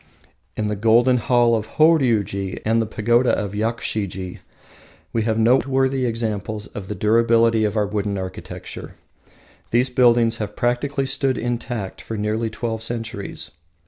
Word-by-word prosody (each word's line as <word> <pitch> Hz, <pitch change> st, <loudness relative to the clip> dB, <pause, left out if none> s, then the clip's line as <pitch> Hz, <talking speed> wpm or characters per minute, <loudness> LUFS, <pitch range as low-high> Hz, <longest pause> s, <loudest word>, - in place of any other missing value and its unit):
In 110 Hz, -, -1 dB
the 105 Hz, 0 st, -1 dB
Golden 115 Hz, +4 st, +4 dB
Hall 120 Hz, 0 st, +3 dB
of 110 Hz, -1 st, -3 dB
Horiuji 115 Hz, -, +2 dB
and 115 Hz, +1 st, +2 dB
the 110 Hz, -, -2 dB
Pagoda 120 Hz, +4 st, +2 dB
of 100 Hz, -1 st, -3 dB
Yakushiji, 105 Hz, -4 st, -3 dB, 0.7 s
we 115 Hz, -, +1 dB
have 110 Hz, 0 st, 0 dB
noteworthy 130 Hz, +2 st, +2 dB
examples 110 Hz, -2 st, -3 dB
of 100 Hz, -2 st, -8 dB
the 105 Hz, -, -4 dB
durability 115 Hz, +2 st, +3 dB
of 105 Hz, +1 st, -1 dB
our 105 Hz, -, +2 dB
wooden 100 Hz, -1 st, -2 dB
architecture. 95 Hz, -1 st, -7 dB, 0.7 s
These 125 Hz, +2 st, +2 dB
buildings 120 Hz, -2 st, +4 dB
have 105 Hz, -2 st, -5 dB
practically 135 Hz, +3 st, 0 dB
stood 135 Hz, -1 st, 0 dB
intact 120 Hz, -4 st, -4 dB
for 110 Hz, -, -6 dB
nearly 110 Hz, +2 st, -1 dB
twelve 115 Hz, 0 st, -4 dB
centuries. 115 Hz, -3 st, -4 dB
115 Hz, 140 wpm, -22 LUFS, 105-120 Hz, 0.7 s, Golden